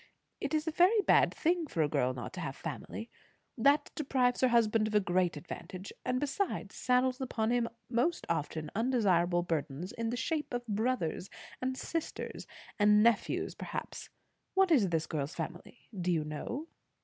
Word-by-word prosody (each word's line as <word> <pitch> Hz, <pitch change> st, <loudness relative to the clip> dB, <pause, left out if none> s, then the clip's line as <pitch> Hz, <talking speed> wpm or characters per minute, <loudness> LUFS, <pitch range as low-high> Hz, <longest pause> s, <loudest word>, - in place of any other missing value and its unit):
It -, -, -1 dB
is 305 Hz, 0 st, 0 dB
a -, -, +1 dB
very 365 Hz, +7 st, +5 dB
bad -, -, +5 dB
thing 340 Hz, 0 st, 0 dB
for 165 Hz, -, +1 dB
a -, -, +2 dB
girl 130 Hz, -3 st, +1 dB
not 125 Hz, -, -6 dB
to 185 Hz, -, -6 dB
have 135 Hz, -4 st, -4 dB
family. 225 Hz, +1 st, -6 dB, 0.4 s
That 280 Hz, +5 st, +3 dB
deprives 255 Hz, -4 st, +1 dB
her 260 Hz, -, +6 dB
husband 225 Hz, -2 st, +3 dB
of 215 Hz, -, -3 dB
a -, -, +7 dB
great 180 Hz, -3 st, +1 dB
advantage; 185 Hz, +4 st, -8 dB
and 255 Hz, -, 0 dB
besides, 290 Hz, +8 st, -2 dB
saddles 255 Hz, +1 st, +1 dB
upon 230 Hz, -3 st, 0 dB
him 240 Hz, -1 st, +1 dB, 0.3 s
often 170 Hz, -, 0 dB
most -, -, -10 dB
undesirable 190 Hz, -7 st, +2 dB
burdens 160 Hz, 0 st, -3 dB
in 230 Hz, 0 st, -3 dB
the 245 Hz, -, -2 dB
shape 300 Hz, -2 st, -2 dB
of 245 Hz, 0 st, -3 dB
brothers 210 Hz, -5 st, -1 dB, 0.3 s
and 260 Hz, 0 st, -1 dB
sisters, 330 Hz, +2 st, -4 dB, 0.3 s
and 210 Hz, 0 st, +6 dB
nephews 235 Hz, -3 st, +2 dB
perhaps. -, -, -6 dB, 0.5 s
What 385 Hz, -2 st, +4 dB
is 230 Hz, -, +5 dB
this 165 Hz, -2 st, 0 dB
girl's 150 Hz, -1 st, -3 dB
family, 175 Hz, +7 st, -7 dB
do 180 Hz, -1 st, 0 dB
you 160 Hz, -3 st, +1 dB
know?" 155 Hz, -, -4 dB
225 Hz, 170 wpm, -32 LUFS, 175-260 Hz, 0.5 s, a